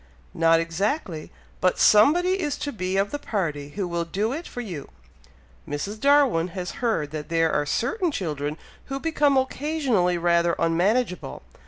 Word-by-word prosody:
"Not 165 0 +4
exactly; 165 - -2 0.3
but 185 0 +2
somebody 350 - +5
is 295 -3 -2
to 285 - -4
be 185 -4 -2
of 200 +1 +1
the 290 - -3
party 155 - -3
who 195 -3 -2
will 170 -1 -2
do 205 +8 -2
it 330 +5 -5
for - - -8
you. 180 - -6 0.8
Mrs. 200 +9 -4
Darwin 275 - +4
has 180 -1 -3
heard 165 -12 0
that 155 0 -6
there 165 -1 +2
are 150 0 0
certain 350 - 0
children 150 - -3 0.3
who 270 0 -4
become 295 -3 +2
occasionally 260 - 0
rather 170 0 +2
unmanageable! 180 - 0
190 Hz, 155 wpm, -24 LUFS, 165-270 Hz, 0.8 s, somebody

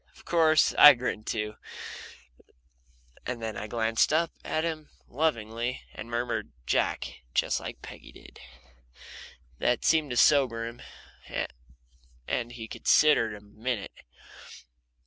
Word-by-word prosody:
Of - - -18
course 160 -2 +4
I 150 -1 +11
grinned 120 -3 -4
too, 105 -1 -3 1.7
and 125 -1 -4
then 110 -1 -4
I 105 +2 -5
glanced 115 +2 +1
up 165 +2 +2
at 155 - -1
him 160 -2 -4 0.2
lovingly 120 -4 -2
and 115 - -8
murmured 120 +1 -2
"Jack," - - -1
just - - +1
like - - -8
Peggy - - -11
did. - - -15 1.2
That 120 -1 +1
seemed 155 -3 +3
to 120 - -3
sober 125 -5 +4
him, 115 +1 -8 1.5
and 120 -1 -2
he 115 -2 -8
considered 115 -5 +3
a 105 - -12
minute. 110 +2 -5
120 Hz, 120 wpm, -28 LUFS, 110-150 Hz, 1.7 s, I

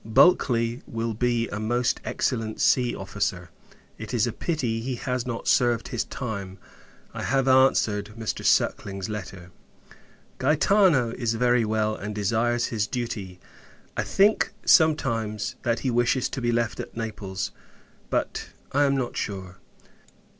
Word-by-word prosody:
Bulkley 115 -1 +3
will 115 0 -3
be 120 +1 0
a 100 - -4
most 120 +3 0
excellent 115 -4 -2
sea 125 -2 +3
officer; 95 -3 -3 0.5
it - - -5
is - - +3
a - - -3
pity 125 -9 -1
he 130 +2 -3
has 125 0 -3
not 115 -2 -4
served 120 -2 +2
his 120 - -2
time. 100 -6 -5 0.6
I - - -5
have 135 0 +1
answered 115 -6 +3
Mr. 110 -1 -3
Suckling's 100 -1 +1
letter. 95 -4 -7 0.9
Gaetano 150 - +3
is 115 -2 -1
very 125 0 +3
well, 110 0 0
and 105 0 -6
desires 115 +4 +1
his 105 -2 0
duty. 105 -7 -4 0.6
I - - 0
think, 205 0 +2
sometimes, 115 - +2
that 120 -2 0
he 130 - 0
wishes 120 +2 +2
to 130 - -5
be 120 0 +1
left 115 -2 -1
at - - -7
Naples; 100 -4 -4 0.6
but, - - -2 0.2
I 145 +1 +3
am 140 -1 +2
not 125 -2 -2
sure. 95 -3 -5
115 Hz, 140 wpm, -25 LUFS, 105-125 Hz, 0.9 s, Bulkley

